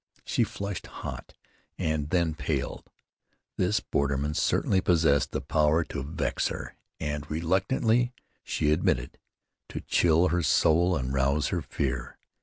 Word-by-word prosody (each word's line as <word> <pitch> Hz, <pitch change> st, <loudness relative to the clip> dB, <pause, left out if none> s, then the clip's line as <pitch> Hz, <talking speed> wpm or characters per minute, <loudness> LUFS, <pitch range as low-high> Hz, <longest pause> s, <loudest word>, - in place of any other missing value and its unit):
She 120 Hz, -, +2 dB
flushed 100 Hz, -3 st, -5 dB
hot -, -, -8 dB, 0.4 s
and 80 Hz, -2 st, -1 dB
then 85 Hz, -2 st, +1 dB
paled. 75 Hz, -, -3 dB, 0.7 s
This 95 Hz, +4 st, +2 dB
borderman 70 Hz, +1 st, -1 dB
certainly 95 Hz, +4 st, +2 dB
possessed 75 Hz, -6 st, +3 dB
the 75 Hz, -, -2 dB
power 75 Hz, +3 st, +2 dB
to 75 Hz, -, -5 dB
vex 70 Hz, +4 st, -1 dB
her, -, -, -6 dB, 0.2 s
and, 75 Hz, -1 st, -3 dB
reluctantly 110 Hz, +9 st, +1 dB, 0.3 s
she 75 Hz, -, 0 dB
admitted, 60 Hz, -6 st, 0 dB, 0.5 s
to -, -, -5 dB
chill 85 Hz, +1 st, +3 dB
her 85 Hz, +2 st, +1 dB
soul 85 Hz, +4 st, +3 dB
and 65 Hz, -2 st, -2 dB
rouse 70 Hz, +2 st, +1 dB
her 90 Hz, -3 st, -1 dB
fear. 65 Hz, -3 st, -3 dB
80 Hz, 130 wpm, -28 LUFS, 70-90 Hz, 0.7 s, possessed